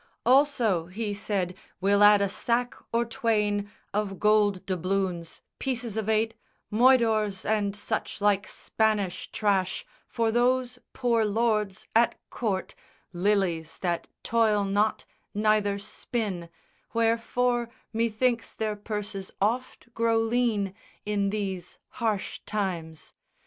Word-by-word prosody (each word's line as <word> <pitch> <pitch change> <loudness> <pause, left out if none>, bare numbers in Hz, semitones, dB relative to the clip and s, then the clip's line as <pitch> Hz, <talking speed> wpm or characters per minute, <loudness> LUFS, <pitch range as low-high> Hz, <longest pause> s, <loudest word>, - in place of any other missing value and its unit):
Also, 245 - +3
he 205 +3 -3
said, 200 -3 -1 0.3
we'll 200 +2 +3
add 205 -1 +7
a - - +2
sack 240 +5 0 0.2
or 235 +1 +2
twain 210 -4 0 0.2
Of 200 -2 -2
gold 210 -3 +3
doubloons, 185 -2 -2 0.2
pieces 240 -5 -2
of 220 -1 -2
eight, 220 +1 +2 0.4
moidores, 220 -5 +4
And 210 -2 +1
such 205 - -3
like 205 -1 +2
Spanish 215 -4 -1
trash, 195 -3 0 0.2
for 230 -1 0
those 250 +1 +1
poor 235 -3 +2
lords 210 -2 0
At 235 +1 +4 0.2
court, 200 -6 -2 0.4
lilies 175 -4 0
that 175 -2 -1 0.2
toil 220 -3 +3
not 205 +2 +1 0.3
neither 210 -1 +2
spin, 200 -3 -4 0.5
Wherefore, 230 +1 +1 0.2
methinks 230 +1 0
their 215 -1 -1
purses 205 -2 -5
oft 240 +3 -2
grow 230 0 +2
lean 225 -4 +1 0.3
In 205 -1 +1
these 195 -4 -4
harsh 220 -4 -2
times. 175 -6 -3
210 Hz, 115 wpm, -27 LUFS, 195-230 Hz, 0.5 s, add